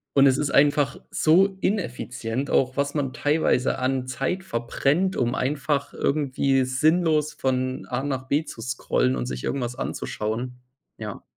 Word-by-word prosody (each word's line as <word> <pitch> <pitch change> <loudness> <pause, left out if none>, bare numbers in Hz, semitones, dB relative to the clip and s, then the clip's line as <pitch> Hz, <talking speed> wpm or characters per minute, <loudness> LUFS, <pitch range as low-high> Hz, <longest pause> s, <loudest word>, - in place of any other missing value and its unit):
Und 140 -1 +7
es 130 -1 +5
ist 150 -1 0
einfach 145 0 +3
so 190 +5 +3
ineffizient. 125 - -2
Auch 130 -1 +2
was 140 0 0
man 135 -3 -1
teilweise 145 -4 +1
an 130 0 0
Zeit 180 +9 -2
verbrennt, 150 +6 0
um 120 0 0
einfach 145 +2 -1
irgendwie 135 -2 +1
sinnlos 155 +3 +2
von 130 0 -1
A 125 +1 -2
nach 130 -2 -3
B 145 +4 +1
zu 115 - -9
scrollen 115 - 0
und 60 -1 -3
sich 60 0 -5
irgendwas 125 -3 -2
anzuschauen, 120 +4 -4 0.4
ja. 105 -3 -7
135 Hz, 150 wpm, -24 LUFS, 125-150 Hz, 0.4 s, Und